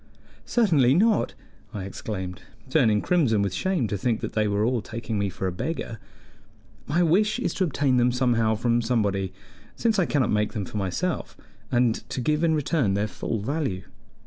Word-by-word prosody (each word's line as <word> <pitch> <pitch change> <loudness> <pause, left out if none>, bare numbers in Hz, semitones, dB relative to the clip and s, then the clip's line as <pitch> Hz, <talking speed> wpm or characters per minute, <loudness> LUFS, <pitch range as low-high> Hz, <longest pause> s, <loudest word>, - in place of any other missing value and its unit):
"Certainly 155 - +4
not!" 215 +4 +2 0.4
I 100 - -4
exclaimed, 95 -1 -5 0.3
turning 110 -9 +3
crimson 130 - +2
with 100 -2 -1
shame 185 -11 0
to 105 - -2
think 115 +1 0
that - - -4
they 110 -1 +1
were 105 +1 +1
all 120 -1 +1
taking 115 -1 -4
me 100 -1 0
for 95 - -5
a 95 - 0
beggar. 115 - -4 0.9
"My 170 +5 +2
wish 205 +7 +3
is 250 - -1
to 190 - 0
obtain 140 -4 +1
them 125 0 +4
somehow 120 -3 +2
from 120 +2 +1
somebody, 100 -5 0 0.4
since 225 -3 +1
I 180 - +2
cannot 135 -6 +1
make 105 0 +1
them 105 -4 -3
for 105 - -6
myself, 105 - -2 0.3
and 120 -2 +3 0.2
to - - -3
give 150 +6 +1
in 160 -1 +3
return 145 - +1
their 100 +1 +1
full 110 0 -4
value." 125 -6 -2
120 Hz, 180 wpm, -25 LUFS, 105-155 Hz, 0.9 s, Certainly